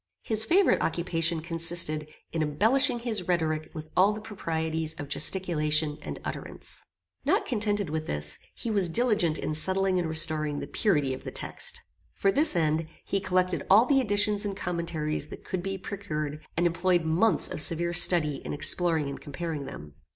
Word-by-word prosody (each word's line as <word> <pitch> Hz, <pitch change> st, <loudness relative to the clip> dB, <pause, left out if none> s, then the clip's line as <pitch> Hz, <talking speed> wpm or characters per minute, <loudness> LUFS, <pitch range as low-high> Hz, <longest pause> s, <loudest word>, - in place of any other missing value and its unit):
His 220 Hz, -1 st, +2 dB
favorite 370 Hz, -, +3 dB
occupation 165 Hz, -1 st, -1 dB
consisted 165 Hz, -2 st, +2 dB, 0.2 s
in 165 Hz, -, -2 dB
embellishing 230 Hz, -, +2 dB
his 225 Hz, -6 st, -1 dB
rhetoric 155 Hz, -3 st, 0 dB
with 155 Hz, 0 st, -8 dB
all 195 Hz, +3 st, +4 dB
the 210 Hz, -, -6 dB
proprieties 160 Hz, -6 st, -3 dB
of 145 Hz, -, -7 dB
gesticulation 155 Hz, -2 st, +2 dB
and -, -, -7 dB
utterance. -, -, -6 dB, 0.4 s
Not -, -, +1 dB
contented 205 Hz, -, -1 dB
with 155 Hz, 0 st, -3 dB
this, 75 Hz, 0 st, -1 dB, 0.2 s
he 235 Hz, -, -4 dB
was 195 Hz, -4 st, +1 dB
diligent 210 Hz, -5 st, +2 dB
in -, -, -3 dB
settling 190 Hz, +3 st, +1 dB
and 170 Hz, -2 st, -2 dB
restoring 155 Hz, -2 st, +2 dB
the -, -, -5 dB
purity 150 Hz, -, +1 dB
of 130 Hz, -, -8 dB
the -, -, -5 dB
text. -, -, -4 dB, 0.3 s
For 195 Hz, -, +2 dB
this 295 Hz, -, +2 dB
end, 160 Hz, -1 st, +1 dB, 0.2 s
he 195 Hz, -, -1 dB
collected 185 Hz, -3 st, 0 dB
all 215 Hz, +5 st, +7 dB
the 275 Hz, 0 st, +3 dB
editions 205 Hz, -2 st, +2 dB
and 200 Hz, -2 st, -3 dB
commentaries 170 Hz, -4 st, -2 dB
that -, -, -11 dB
could 185 Hz, -, -3 dB
be 195 Hz, +1 st, -4 dB
procured, 155 Hz, -6 st, -5 dB
and 175 Hz, -, +2 dB
employed 175 Hz, 0 st, +2 dB
months 170 Hz, +8 st, +2 dB
of -, -, -3 dB
severe 170 Hz, +2 st, +2 dB
study 160 Hz, -4 st, +4 dB
in -, -, -5 dB
exploring 160 Hz, 0 st, +1 dB
and 140 Hz, -, -7 dB
comparing 150 Hz, 0 st, -5 dB
them. 75 Hz, -, -10 dB
170 Hz, 170 wpm, -27 LUFS, 155-195 Hz, 0.4 s, all